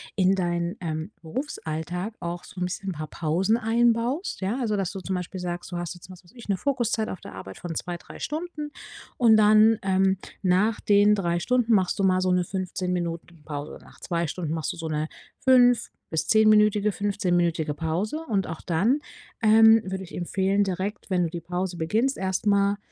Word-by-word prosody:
in 190 -1 +3
dein, 175 0 -1
ähm, 160 +1 -3
Berufsalltag 180 - -4
auch 175 +1 -5
so 180 - -10
'n - - +2
bisschen 190 +2 -4
'n - - -4
paar 155 -1 -6
Pausen 175 +9 0
einbaust. 235 - +1
Ja, 205 +7 -1
also, 215 -5 0
dass 195 -3 -1
du 195 - -6
zum 190 +1 -3
Beispiel 180 +1 -5
sagst, 175 0 -5
du 175 - -3
hast 175 0 -4
jetzt, 175 +1 -13
was 185 0 -13
weiß 175 - -21
ich, 235 - -12
'ne 195 - +2
Fokuszeit 240 -3 0
auf 185 - -6
der - - -10
Arbeit 95 0 -9
von 175 -2 -6
2, 175 +2 -4
3 - - -13
Stunden 305 -1 -4 0.5
und 225 -3 +6
dann, 215 +1 +6
ähm, 190 0 +2 0.3
nach 190 +4 +2
den 205 0 +5
3 175 -3 0
Stunden 245 +3 +2
machst 190 -4 +2
du - - +1
mal 185 -1 +3
so 185 0 +1
'ne 180 0 +2
15 185 0 -3
Minuten 170 -2 -4
Pause, 145 -1 -6
nach - - -18
2 170 -1 -1
Stunden 160 0 -3
machst 160 -4 -2
du - - -12
so 165 -1 -5
'ne 155 0 -1 0.3
5 245 -2 +4 0.2
bis 160 -1 -1
10-minütige, 210 -1 +4
15-minütige 175 -6 0
Pause 165 - -2
und 195 -3 0
auch 165 0 -6
dann, 200 - +1 0.4
ähm, 225 0 +7
würde 190 0 -4
ich 180 - -10
empfehlen, 190 +3 +1
direkt, 195 +2 -4
wenn 180 -2 +2
du 170 - -1
die 170 +1 -6
Pause 180 +1 -3
beginnst, 220 +11 0
erst 190 +1 -2
mal 200 0 +3
190 Hz, 200 wpm, -25 LUFS, 175-215 Hz, 0.5 s, ähm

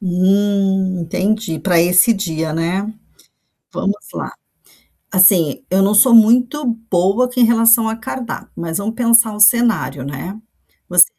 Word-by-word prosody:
Hum, 190 0 -1
entendi, 185 +1 -3
para 175 -4 +1
esse 180 +7 +3
dia, 160 -5 -4
né, 170 +4 -2 0.9
vamos 200 - -2 0.2
lá, - - -6 0.8
assim, 185 - +3
eu 190 +1 +1
não 200 +2 +1
sou 235 +3 +5
muito 245 +6 +3 0.3
boa 195 +8 +1
em 250 - +4
relação 230 0 +3
a 220 - -3
cardápio, 230 +2 -8
mas 165 +2 -5
vamos 215 +3 -5
pensar 230 -2 +2
o 210 - -9
cenário, 220 - +2
né, 175 +10 -8 0.5
você - - +6
200 Hz, 135 wpm, -16 LUFS, 180-230 Hz, 0.9 s, você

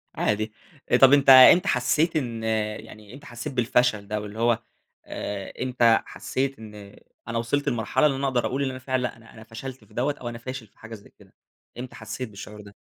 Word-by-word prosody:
عادي، 110 +1 -1 0.5
طَب 135 +1 +8
أنت 140 -1 +4
إمتى 130 +7 +9
حسّيت 155 +6 +1
إن 120 -6 -2
يعني 110 -1 -4
إمتى 140 +1 -13
حسّيت 120 +2 -7
بالفشل 120 -4 +1
ده 105 0 -3
واللي 105 +2 -8
هو، 120 0 +2 0.5
آآ، 100 -1 -6
إمتى 120 -3 +3
حسّيت 135 -1 -3
إن 105 -2 -12 0.3
أنا 115 0 -3
وصلت 130 +5 -1
لمرحلة 115 +5 0
اللي 135 -3 +2
أنا 140 0 -1
أقدر 125 -2 0
أقول 135 +2 -2
اللي 135 -1 -1
أنا 130 - -8
فعلًا 130 0 -2
لأ، 120 -2 -4
أنا 115 0 -18
أنا 110 - -13
فشلت 120 +2 -9
في 105 - -23
دَوّة 140 +5 -1
أو 120 - -4
أنا 120 - -7
فاشل 125 -1 -7
في - - -33
حاجة 110 +1 -9
زي 100 - -16
كده، - - -20 0.5
إمتى 125 0 -8
حسّيت 110 +2 -6
بالشعور 105 +1 -10
ده؟ 100 0 -15
120 Hz, 205 wpm, -25 LUFS, 110-130 Hz, 0.5 s, إمتى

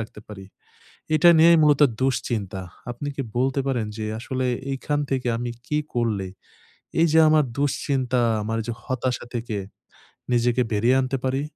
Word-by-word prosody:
রাখতে 110 -1 -8
পারি, 95 -2 -9 0.7
এটা 175 +3 +6
নিয়েই 170 +1 +7
মূলত 150 -1 +4 0.2
দুশ্চিন্তা। 110 -7 -1 0.3
আপনি 120 +4 -6
কি 140 - -2 0.2
বলতে 135 +2 +1
পারেন 125 -5 0
যে, 110 - -3
আসলে 130 +2 -3 0.3
এইখান 145 +2 -2
থেকে 130 -2 -1
আমি 120 0 -3 0.2
কী 150 - 0 0.2
করলে, 110 -5 0 0.7
এইযে 160 -1 +4
আমার 155 -1 +4
দুশ্চিন্তা, 130 -3 0 0.2
আমার 110 +2 -2
যে 120 - -2
হতাশা 130 -1 -2
থেকে 115 -2 -3 0.8
নিজেকে 120 +1 +2
বেরিয়ে 115 +5 +3
আনতে 130 +1 -2
পারি? 130 +1 0
130 Hz, 145 wpm, -23 LUFS, 115-140 Hz, 0.8 s, নিয়েই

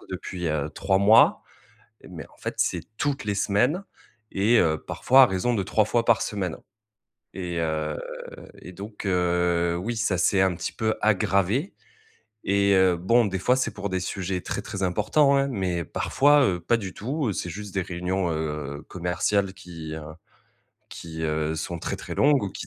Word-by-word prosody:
que - - -17
depuis, 90 -2 -5
heu, 75 -1 -1
3 95 -1 +1
mois, 105 +3 +5 0.7
mais 85 -3 -8
en - - -23
fait, - - -5
c'est 85 - 0 0.2
toutes 145 -1 -1
les 105 -1 -2
semaines 120 - +1 0.5
et 105 +5 +3
heu, 80 -2 +2
parfois 135 +1 +5
à - - +8
raison 95 +6 0
de 100 - 0
3 100 +3 +2
fois 115 +2 +1
par 115 -3 +4
semaine 95 -5 -3 0.8
et 90 -2 -4
heu 80 -1 -2 0.6
et 90 - -10
donc 105 +3 -9
heu, 90 -2 +1
oui, 115 +7 -3
ça 105 -5 0
s'est 95 +2 +3
un 95 -2 +2
petit - - -4
peu 110 0 -1
aggravé. 100 - +1 0.7
Et 100 0 +2
heu, 95 -1 +4
bon, 115 +7 +3
des 95 -2 -2
fois, 125 +7 +3
c'est 120 -4 -1
pour 100 -1 -5
des 95 0 -1
sujets 90 0 -3
très, - - -4
très 95 -2 -5
importants, 110 +10 +3
hein, 140 0 +2
mais 90 -7 -2
parfois, 145 - +3
heu, 90 -5 0
pas 120 +6 +1
du 95 -4 -6
tout. 130 -1 -2
C'est 90 +2 -4
juste 100 +3 -8
des 95 - 0
réunions, 90 0 -2
heu, 75 -2 -4
commerciales 95 +2 -1
qui, 85 -5 -9
heu 80 - -7 0.9
qui 80 -1 -8
heu, 75 0 -1
sont 85 +2 -4
très, - - -3
très - - -7
longues 145 -5 +3
ou 100 - -4
qui 85 - -8
95 Hz, 185 wpm, -25 LUFS, 85-110 Hz, 0.9 s, à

